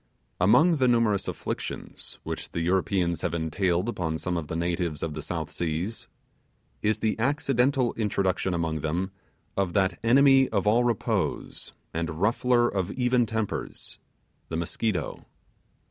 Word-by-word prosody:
Among 155 Hz, -, +5 dB
the 130 Hz, -2 st, +3 dB
numerous 115 Hz, -5 st, +2 dB
afflictions -, -, -5 dB
which -, -, -6 dB
the 85 Hz, -, -1 dB
Europeans 90 Hz, -1 st, +1 dB
have 85 Hz, -1 st, -1 dB
entailed 85 Hz, +4 st, 0 dB
upon 80 Hz, -8 st, -2 dB
some 90 Hz, +2 st, -2 dB
of 85 Hz, -3 st, -3 dB
the 80 Hz, -, -4 dB
natives 85 Hz, -2 st, -1 dB
of 80 Hz, -2 st, -2 dB
the 80 Hz, -, -5 dB
South 80 Hz, +1 st, -4 dB
Seas, 85 Hz, +6 st, -3 dB, 0.7 s
is 110 Hz, +1 st, +1 dB
the 110 Hz, -, +1 dB
accidental 135 Hz, -1 st, +2 dB
introduction 95 Hz, -4 st, 0 dB
among 80 Hz, -2 st, -1 dB
them 85 Hz, +6 st, -2 dB, 0.4 s
of 95 Hz, -3 st, 0 dB
that 95 Hz, -3 st, +1 dB
enemy 135 Hz, +2 st, +6 dB
of 100 Hz, -3 st, 0 dB
all 115 Hz, +4 st, +4 dB
repose 120 Hz, -4 st, -1 dB, 0.2 s
and 85 Hz, -1 st, -3 dB
ruffler 120 Hz, +4 st, +3 dB
of 95 Hz, -4 st, -1 dB
even 125 Hz, -2 st, +2 dB
tempers 110 Hz, -1 st, -4 dB, 0.5 s
the 80 Hz, -, -2 dB
Mosquito. 90 Hz, +4 st, -2 dB
95 Hz, 140 wpm, -27 LUFS, 85-115 Hz, 0.7 s, enemy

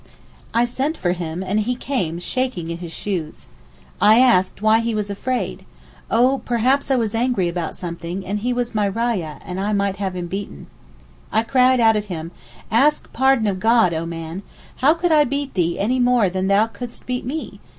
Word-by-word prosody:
I 235 Hz, +1 st, +3 dB
sent 270 Hz, +6 st, -2 dB
for 175 Hz, -, 0 dB
him, 175 Hz, 0 st, -4 dB
and 195 Hz, +3 st, 0 dB
he 240 Hz, +4 st, 0 dB
carne 215 Hz, -, -2 dB
shaking 185 Hz, -5 st, -2 dB
in 170 Hz, -, -5 dB
his 170 Hz, -2 st, -7 dB
shoes. 175 Hz, -5 st, -5 dB, 0.6 s
I 215 Hz, +2 st, +7 dB
asked 215 Hz, -9 st, +3 dB
why 215 Hz, +1 st, +4 dB
he 230 Hz, -1 st, -1 dB
was 205 Hz, -1 st, -2 dB
afraid? 250 Hz, +5 st, -3 dB, 0.5 s
'Oh, 255 Hz, +4 st, +3 dB
perhaps 255 Hz, +4 st, +1 dB
I 270 Hz, -, +3 dB
was 225 Hz, -4 st, 0 dB
angry 230 Hz, -5 st, +1 dB
about 170 Hz, -1 st, -3 dB
something, 170 Hz, +2 st, -5 dB
and 205 Hz, +3 st, -2 dB
he 245 Hz, +4 st, -1 dB
was 245 Hz, -1 st, -2 dB
my 210 Hz, -2 st, +1 dB
rayah, 200 Hz, -7 st, -2 dB
and 180 Hz, 0 st, -5 dB
I 205 Hz, +2 st, -1 dB
might 200 Hz, -1 st, 0 dB
have 190 Hz, -2 st, -3 dB
him 180 Hz, -1 st, -3 dB
beaten.' 190 Hz, -, -6 dB, 0.7 s
I 220 Hz, +2 st, +2 dB
cried 255 Hz, +1 st, +3 dB
out 225 Hz, -1 st, +5 dB
at 210 Hz, 0 st, -1 dB
him, 165 Hz, -4 st, -6 dB, 0.4 s
'Ask 275 Hz, +7 st, +2 dB
pardon 265 Hz, -3 st, +3 dB
of 195 Hz, -3 st, -1 dB
God, 225 Hz, -4 st, +4 dB
O 165 Hz, +1 st, -3 dB
man. 165 Hz, +2 st, -6 dB, 0.4 s
How 290 Hz, +5 st, +4 dB
could 345 Hz, 0 st, 0 dB
I 305 Hz, -1 st, +6 dB
beat 280 Hz, 0 st, -3 dB
thee 170 Hz, -2 st, 0 dB
any 245 Hz, +6 st, 0 dB
more 245 Hz, -6 st, +3 dB
than 185 Hz, +1 st, -1 dB
thou 200 Hz, +2 st, +4 dB
couldst 240 Hz, +1 st, -9 dB
beat 250 Hz, 0 st, -3 dB
me? 295 Hz, +6 st, -5 dB
215 Hz, 195 wpm, -21 LUFS, 185-250 Hz, 0.7 s, I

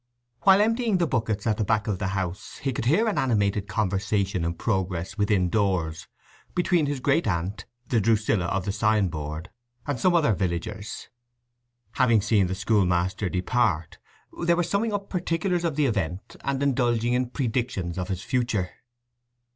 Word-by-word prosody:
While 195 Hz, 0 st, +6 dB
emptying 225 Hz, -1 st, +2 dB
the 175 Hz, -, +2 dB
buckets 110 Hz, -7 st, -1 dB
at 110 Hz, -2 st, +1 dB
the 110 Hz, -, 0 dB
back 105 Hz, +1 st, +1 dB
of 105 Hz, -5 st, -2 dB
the 100 Hz, -, -1 dB
house 95 Hz, -1 st, -4 dB
he 135 Hz, -2 st, -2 dB
could 115 Hz, -, -3 dB
hear 195 Hz, -, +3 dB
an 215 Hz, -, +1 dB
animated 105 Hz, -5 st, +1 dB
conversation 100 Hz, -3 st, 0 dB
in 85 Hz, +1 st, -1 dB
progress 95 Hz, -2 st, -2 dB
within 105 Hz, -3 st, +2 dB
doors 90 Hz, -6 st, 0 dB, 0.5 s
between 175 Hz, -3 st, +2 dB
his 145 Hz, -1 st, -2 dB
great 140 Hz, +3 st, +2 dB
aunt, 95 Hz, +2 st, -2 dB, 0.2 s
the 115 Hz, -3 st, +2 dB
Drusilla 105 Hz, -3 st, +2 dB
of 95 Hz, +1 st, -1 dB
the 100 Hz, -, 0 dB
sign 105 Hz, -2 st, +2 dB
board, 75 Hz, +1 st, -6 dB, 0.3 s
and 145 Hz, -3 st, -2 dB
some 180 Hz, -2 st, +3 dB
other 150 Hz, -10 st, +4 dB
villagers. 100 Hz, +3 st, -4 dB, 0.8 s
Having 115 Hz, -4 st, +3 dB
seen 105 Hz, -2 st, +2 dB
the 95 Hz, -, -2 dB
school 100 Hz, -1 st, +2 dB
master 90 Hz, +2 st, 0 dB
depart, 90 Hz, -4 st, 0 dB, 0.4 s
they 170 Hz, 0 st, +4 dB
were 175 Hz, -, +1 dB
summing 200 Hz, +6 st, 0 dB
up 200 Hz, -1 st, -3 dB
particulars 175 Hz, 0 st, -1 dB
of 165 Hz, -4 st, 0 dB
the 150 Hz, -1 st, +2 dB
event, 95 Hz, -, -2 dB
and 140 Hz, 0 st, -1 dB
indulging 120 Hz, -3 st, +1 dB
in 125 Hz, 0 st, 0 dB
predictions 115 Hz, -, -2 dB
of 90 Hz, -, -3 dB
his 95 Hz, -2 st, -4 dB
future. 115 Hz, -8 st, -1 dB
110 Hz, 170 wpm, -26 LUFS, 95-135 Hz, 0.8 s, While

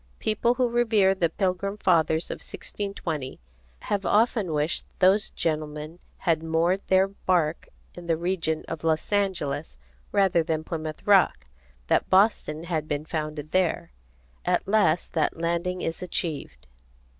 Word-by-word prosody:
People 235 Hz, +3 st, +1 dB
who 250 Hz, 0 st, +2 dB
revere 225 Hz, -5 st, +3 dB
the 175 Hz, -3 st, +1 dB
Pilgrim 195 Hz, +2 st, -1 dB
Fathers 165 Hz, -4 st, +2 dB
of -, -, -4 dB
1620 165 Hz, -9 st, -5 dB, 0.4 s
have 200 Hz, -1 st, -2 dB
often 215 Hz, -3 st, +2 dB
wished 150 Hz, +1 st, 0 dB
those 195 Hz, +3 st, +4 dB
gentlemen 155 Hz, 0 st, -3 dB, 0.2 s
had 165 Hz, -2 st, +1 dB
moored 165 Hz, +4 st, +1 dB
their 190 Hz, 0 st, +4 dB
bark 175 Hz, -5 st, 0 dB, 0.3 s
in 175 Hz, -1 st, -10 dB
the 165 Hz, -1 st, +2 dB
region 170 Hz, -2 st, -1 dB
of 165 Hz, -1 st, -6 dB
Los 160 Hz, +2 st, 0 dB
Angeles 175 Hz, -8 st, -1 dB, 0.3 s
rather 195 Hz, -4 st, +3 dB
than 160 Hz, -1 st, -2 dB
Plymouth 155 Hz, -1 st, -5 dB
Rock, 190 Hz, -, +4 dB, 0.4 s
that -, -, +1 dB
Boston 185 Hz, -5 st, +3 dB
had 160 Hz, -3 st, -2 dB
been 150 Hz, 0 st, -2 dB
founded 155 Hz, -1 st, -4 dB
there. 185 Hz, -, 0 dB, 0.5 s
At -, -, 0 dB
last 200 Hz, -5 st, +2 dB
that 160 Hz, -1 st, 0 dB
landing 170 Hz, +2 st, -1 dB
is 165 Hz, +3 st, -3 dB
achieved. 160 Hz, -, -4 dB
170 Hz, 135 wpm, -26 LUFS, 155-195 Hz, 0.5 s, those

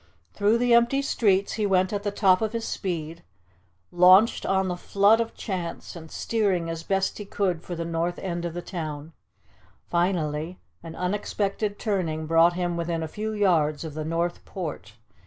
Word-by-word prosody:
Through 210 Hz, +2 st, +2 dB
the 245 Hz, 0 st, +2 dB
empty 240 Hz, +4 st, +4 dB
streets 200 Hz, -7 st, +1 dB
he 215 Hz, -2 st, 0 dB
went 185 Hz, 0 st, +2 dB
at 205 Hz, -, -1 dB
the 205 Hz, -, -1 dB
top 195 Hz, -2 st, +3 dB
of 220 Hz, 0 st, -1 dB
his 230 Hz, -1 st, -3 dB
speed, 165 Hz, -4 st, -4 dB, 0.7 s
launched 185 Hz, +5 st, +5 dB
on 190 Hz, 0 st, +1 dB
the 180 Hz, -, -2 dB
flood 200 Hz, +5 st, +3 dB
of 230 Hz, -, -4 dB
chance, 180 Hz, -5 st, -5 dB
and 160 Hz, -2 st, -10 dB
steering 190 Hz, -7 st, -1 dB
as 165 Hz, 0 st, -5 dB
best 195 Hz, +4 st, -1 dB
he -, -, -4 dB
could 190 Hz, -4 st, -1 dB
for 175 Hz, -, -6 dB
the 165 Hz, 0 st, -4 dB
north 170 Hz, +1 st, -2 dB
end 175 Hz, -2 st, -4 dB
of 170 Hz, -1 st, -4 dB
the 175 Hz, -, -5 dB
town. 155 Hz, -3 st, -6 dB, 0.8 s
Finally, 170 Hz, -2 st, 0 dB, 0.2 s
an 165 Hz, -1 st, -9 dB
unexpected 200 Hz, +2 st, -2 dB
turning 175 Hz, -8 st, -2 dB
brought 165 Hz, +2 st, +4 dB
him 175 Hz, -1 st, -2 dB
within 165 Hz, -1 st, -2 dB
a -, -, -3 dB
few 215 Hz, +7 st, -4 dB
yards 170 Hz, -8 st, +1 dB
of 160 Hz, -2 st, -6 dB
the 155 Hz, +1 st, -4 dB
North 170 Hz, +2 st, -2 dB
Port. 150 Hz, -, -6 dB
180 Hz, 175 wpm, -25 LUFS, 165-205 Hz, 0.8 s, launched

